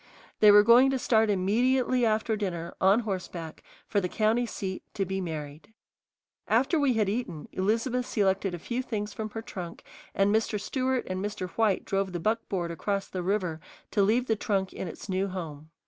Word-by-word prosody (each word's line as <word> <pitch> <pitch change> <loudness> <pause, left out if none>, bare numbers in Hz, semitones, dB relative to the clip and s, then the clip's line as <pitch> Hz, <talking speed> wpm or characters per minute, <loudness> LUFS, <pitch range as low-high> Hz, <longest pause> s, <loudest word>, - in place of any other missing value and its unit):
They 210 - +7
were 205 0 +8
going 240 +4 +7
to 270 - +1
start 225 -3 +2
immediately 240 +6 +2
after 220 0 +1
dinner, 175 -5 -4
on 195 +5 +5
horseback, 180 -6 -5 0.2
for 205 - 0
the 180 - -2
county 225 +4 +1
seat, 190 -3 -4
to 195 - 0
be 190 +1 -3
married. 155 +3 -7 0.7
After 265 +8 +2
we 280 -3 +3
had 215 -3 +1
eaten, 195 -7 -3
Elizabeth 230 +6 0
selected 195 -3 +1
a - - -6
few 235 +9 -3
things 210 -5 -4
from 215 -1 -4
her 225 +1 -6
trunk, 175 -6 -7 0.3
and 195 +1 +3
Mr. 215 -1 +1
Stewart 260 +4 -1
and 185 +1 -3
Mr. 205 -3 -4
White 215 -4 +1
drove 195 -1 -1
the 175 - -2
buckboard 195 -3 -1
across 195 +4 -2
the 185 - -4
river 180 -4 -1 0.3
to 205 - +2
leave 225 +5 +3
the 225 - +1
trunk 195 -3 -1
in - - -5
its - - -9
new 190 0 0
home. 160 -5 -7
205 Hz, 185 wpm, -28 LUFS, 185-225 Hz, 0.7 s, were